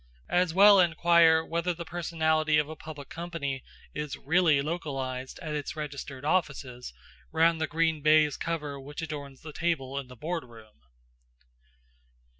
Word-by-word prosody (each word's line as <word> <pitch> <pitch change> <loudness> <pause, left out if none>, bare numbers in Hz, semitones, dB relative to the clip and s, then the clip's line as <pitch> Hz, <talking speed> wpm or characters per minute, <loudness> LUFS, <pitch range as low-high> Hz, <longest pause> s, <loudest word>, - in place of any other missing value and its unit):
As 180 -1 +2
well 200 +3 +7
inquire 170 -2 +5
whether 170 +1 -1
the 170 0 -7
personality 160 -2 +1
of 150 -1 +2
a 155 - -7
public 150 -3 -9
company 160 -6 -5 0.3
is 150 -1 -4
really 160 -1 +3
localised 135 -5 -4
at 155 -2 -4
its 150 0 -4
registered 140 -2 -6
offices, 140 - -1 0.4
round 165 0 +3
the 160 - +1
green 160 0 0
baize 155 -1 +4
cover 150 -4 -4
which 145 +4 -7
adorns 145 -4 -7
the 155 -1 -8
table 140 -6 -1
in 135 - -8
the 125 - -12
boardroom. 120 -8 -7
155 Hz, 140 wpm, -28 LUFS, 140-165 Hz, 0.4 s, well